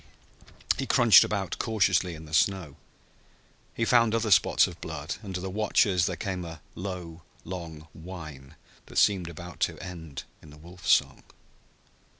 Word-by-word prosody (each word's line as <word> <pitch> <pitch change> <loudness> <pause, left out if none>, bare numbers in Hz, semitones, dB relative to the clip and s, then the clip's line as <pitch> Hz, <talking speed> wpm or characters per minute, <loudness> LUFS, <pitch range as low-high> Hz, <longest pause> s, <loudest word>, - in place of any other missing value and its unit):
He - - -2
crunched - - +7
about - - -3
cautiously 95 -5 +1
in 80 +1 -11
the 75 - -13
snow. 85 -3 +1 1.0
He 115 - 0
found 115 -2 +4
other 115 -2 0
spots 90 0 +5
of 90 -3 -9
blood, 75 -1 -5
and 95 -4 -7
to 90 - -3
the 95 - -4
watchers 100 -3 +2
there 95 - -2
came 90 +1 -4
a 85 -1 -8
low 90 -3 -7 0.2
long 80 -3 -7
whine 80 -6 -10 0.3
that - - -9
seemed 95 -5 +3
about 85 +1 -10
to - - 0
end 80 -6 -8 0.2
in 75 - -15
the 75 - -14
wolf 85 +3 -12
song. - - +3
90 Hz, 155 wpm, -27 LUFS, 80-95 Hz, 1.0 s, crunched